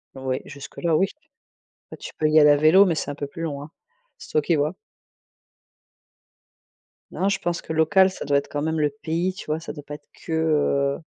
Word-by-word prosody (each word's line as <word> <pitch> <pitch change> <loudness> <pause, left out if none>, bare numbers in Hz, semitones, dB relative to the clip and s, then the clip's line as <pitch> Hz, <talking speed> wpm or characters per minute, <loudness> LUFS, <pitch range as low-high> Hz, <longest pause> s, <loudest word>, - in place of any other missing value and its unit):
Oui 130 -1 -3
jusque 140 -1 -11
là, 165 -3 +2
oui. 190 +4 +3 0.8
Bah, - - -8
tu - - -9
peux 155 - +2
y 155 0 +6
aller 150 -1 +7
à 145 - +5
vélo, 165 +7 +6
mais 170 - +1
c'est - - -3
un 145 - -7
peu 145 - -5
plus 150 +4 -9
loin. 145 -1 -5 0.5
C'est - - -13
toi 155 - +2
qui 165 +2 +1
vois. 150 +4 0 2.4
Non, 195 - 0
je 195 - +1
pense 175 -2 -2
que - - -8
local 185 +5 +4
ça 185 - -8
doit 140 0 +2
être 140 - -3
quand 145 - -3
même 160 0 -1
le 150 -1 +2
pays, 165 +5 -2
tu - - -10
vois? 155 +1 -2
Ça 165 - -7
doit 145 -2 -10
pas 145 - -8
être 145 0 -16
que, 165 - -11
heu 145 -3 +1
155 Hz, 220 wpm, -23 LUFS, 145-165 Hz, 2.4 s, aller